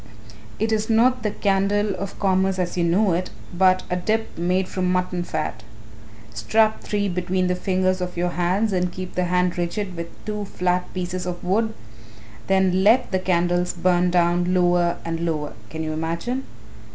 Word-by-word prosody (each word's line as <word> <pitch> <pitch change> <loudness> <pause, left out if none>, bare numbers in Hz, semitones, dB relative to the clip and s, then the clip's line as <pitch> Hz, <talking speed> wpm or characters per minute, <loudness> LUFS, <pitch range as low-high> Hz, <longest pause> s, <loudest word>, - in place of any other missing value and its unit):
It 220 +1 0
is 220 0 0
not 245 +3 +3
the 215 - 0
candle 200 +1 +1
of 195 0 -6
commerce 190 -1 +2
as 180 -1 -2
you 175 - +1
know 180 +3 +3
it, 180 +2 -1 0.3
but 185 0 +4
a 180 - -1
dip 220 +5 -1
made 180 +2 0
from 185 -1 -1
mutton 180 -1 0
fat. 155 -9 -3 0.7
Strap 215 - +2
three 205 -1 -1
between 185 0 -1
the 180 - +1
fingers 185 0 0
of 180 -1 -4
your 175 +1 +1
hands 185 +5 0
and 180 -1 0
keep 185 0 -7
the 180 - 0
hand 180 0 +1
rigid 185 +2 -2
with 170 0 -5 0.2
two 210 -1 -3
flat 180 -1 -1
pieces 180 0 -3
of 175 -1 -5
wood; 220 +5 0 0.7
then 190 -1 +3
let 230 +5 +4
the 190 - +1
candles 175 -1 +1
burn 180 0 +2
down 175 +1 +2
lower 175 -1 +2
and 165 -1 -2
lower 155 -3 -2 0.2
can 160 +1 -5
you 155 0 -3
imagine? 170 +12 -3
180 Hz, 175 wpm, -23 LUFS, 175-195 Hz, 0.7 s, but